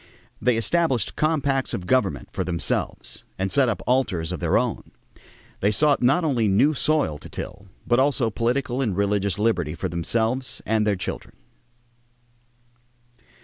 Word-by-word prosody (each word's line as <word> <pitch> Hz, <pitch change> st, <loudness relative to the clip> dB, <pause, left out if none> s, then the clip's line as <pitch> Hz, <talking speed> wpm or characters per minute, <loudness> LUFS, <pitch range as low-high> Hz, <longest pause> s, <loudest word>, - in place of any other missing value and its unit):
They 125 Hz, -2 st, +2 dB
established 130 Hz, -, +1 dB
compacts 140 Hz, -4 st, 0 dB
of 90 Hz, -, -6 dB
government 90 Hz, -, +1 dB
for 95 Hz, -, -2 dB
themselves 85 Hz, -2 st, -2 dB
and 95 Hz, 0 st, -1 dB
set 130 Hz, +4 st, +3 dB
up 105 Hz, -6 st, -3 dB
altars 105 Hz, -10 st, +1 dB
of -, -, -4 dB
their -, -, +2 dB
own. -, -, -2 dB, 0.7 s
They 100 Hz, -, +2 dB
sought 145 Hz, +6 st, +3 dB
not 135 Hz, +8 st, +3 dB
only 125 Hz, -8 st, +1 dB
new 105 Hz, +10 st, +4 dB
soil 145 Hz, -, 0 dB
to -, -, -11 dB
till 100 Hz, 0 st, -7 dB, 0.2 s
but 120 Hz, +1 st, +3 dB
also 130 Hz, -4 st, +2 dB
political 125 Hz, +3 st, -1 dB
and 105 Hz, -8 st, -1 dB
religious 100 Hz, -2 st, +1 dB
liberty 105 Hz, -8 st, 0 dB
for 95 Hz, -, -3 dB
themselves 115 Hz, +9 st, -1 dB
and 110 Hz, -1 st, +1 dB
their 105 Hz, -, +2 dB
children. 95 Hz, -, -6 dB
115 Hz, 145 wpm, -24 LUFS, 95-135 Hz, 0.7 s, new